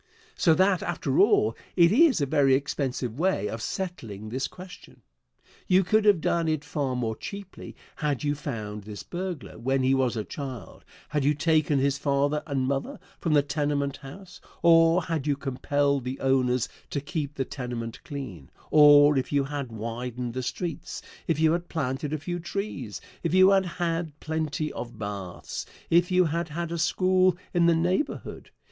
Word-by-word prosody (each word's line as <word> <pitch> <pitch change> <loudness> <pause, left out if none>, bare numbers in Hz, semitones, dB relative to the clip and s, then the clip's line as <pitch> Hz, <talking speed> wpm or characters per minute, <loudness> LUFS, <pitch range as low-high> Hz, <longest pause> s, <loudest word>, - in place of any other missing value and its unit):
So 165 -2 +4
that, 185 0 +3
after 150 -5 -1
all, 190 - +4 0.2
it 170 -1 +6
is 290 - +5
a - - +3
very 135 -1 +4
expensive 130 -3 -2
way 180 - +1
of 110 +1 -5
settling 110 - -5
this 130 +3 -2
question. 185 0 -13 0.7
You 185 +1 +5
could 215 +4 +2
have 200 -6 +5
done 170 0 +1
it 155 -2 -1
far 140 -4 -2
more 115 -3 -1
cheaply 200 - -9 0.2
had 150 -4 -1
you 145 0 +1
found 110 -8 -5
this 105 0 -8
burglar 175 -9 -6
when 135 +2 0
he 130 +1 +3
was 130 -3 +1
a 110 - -1
child; 130 -5 -8 0.3
had 150 -2 0
you 145 +2 +3
taken 155 -1 +2
his 140 +1 +1
father 145 +1 +1
and 140 -3 -1
mother 135 0 -2 0.2
from 165 - 0
the 145 -1 +5
tenement 145 -1 -1
house, 180 +7 -12 0.2
or 165 +1 +6
had 160 -3 -2
you 145 - +2
compelled 140 0 0
the 130 +2 -4
owners 130 -2 +2 0.2
to 145 - -2
keep 145 0 -4
the 135 - -1
tenement 120 -4 -6
clean; 130 - -7 0.2
or 145 -1 +7
if 130 - -5
you 140 -1 +2
had 140 -3 -5
widened 120 +2 -4
the 130 - -2
streets, 165 +5 -5 0.2
if 160 -3 +1
you 160 0 +4
had 175 +1 -2
planted 140 -1 -2
a 155 - 0
few 175 +4 -4
trees, 165 - -5 0.2
if 170 +1 0
you 185 +1 +7
had 195 -1 +3
had 165 -3 -3
plenty 155 -1 -2
of 120 -1 -7
baths, 100 -4 -5 0.3
if 175 +1 +4
you 185 -1 +4
had 165 +1 -2
had 170 +2 -4
a 170 - -3
school 185 +2 +3 0.2
in 170 -1 +4
the 170 - +5
neighborhood. 180 - -2
145 Hz, 175 wpm, -27 LUFS, 130-170 Hz, 0.7 s, or